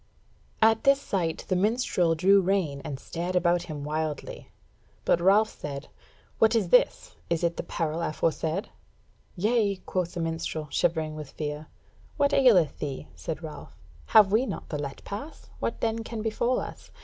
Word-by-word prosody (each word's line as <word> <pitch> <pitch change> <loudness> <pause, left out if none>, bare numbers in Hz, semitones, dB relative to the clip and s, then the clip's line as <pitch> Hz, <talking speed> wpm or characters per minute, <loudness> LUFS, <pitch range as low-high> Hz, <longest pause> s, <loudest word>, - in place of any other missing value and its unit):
At 225 +2 +4
this 275 -1 +5
sight 175 - -2
the 185 - +1
minstrel 185 -4 +2
drew 195 +4 +5
rein 180 -7 0
and 135 -2 -5
stared 175 +4 -4
about 175 -1 +3
him 145 -2 -5
wildly; 155 0 -4 0.6
but 170 - +3
Ralph 205 +4 +4
said: 140 -1 -7 0.5
"What 225 +1 +5
is 205 -6 +1
this, 250 - +3
is 170 0 0
it 170 0 +1
the - - -3
peril 165 -1 -2
aforesaid?" 160 +3 -1 0.7
"Yea," 210 +1 +2
quoth 180 -2 -2
the - - -3
minstrel, 165 -1 -3
shivering 160 -2 0
with 150 -2 -7
fear. 150 0 -5 0.5
"What 285 -1 +2
aileth 210 - +4
thee?" 135 - -5
said 75 +1 -6
Ralph; - - -9 0.3
"have 205 -3 +6
we 235 +5 +3
not 200 - -6
the 150 - -3
let 140 -1 -6
pass, 280 +10 -8
what 230 - -3
then 225 0 0
can 225 -1 -5
befall 235 +3 +1
us? - - -8
175 Hz, 160 wpm, -27 LUFS, 155-215 Hz, 0.7 s, have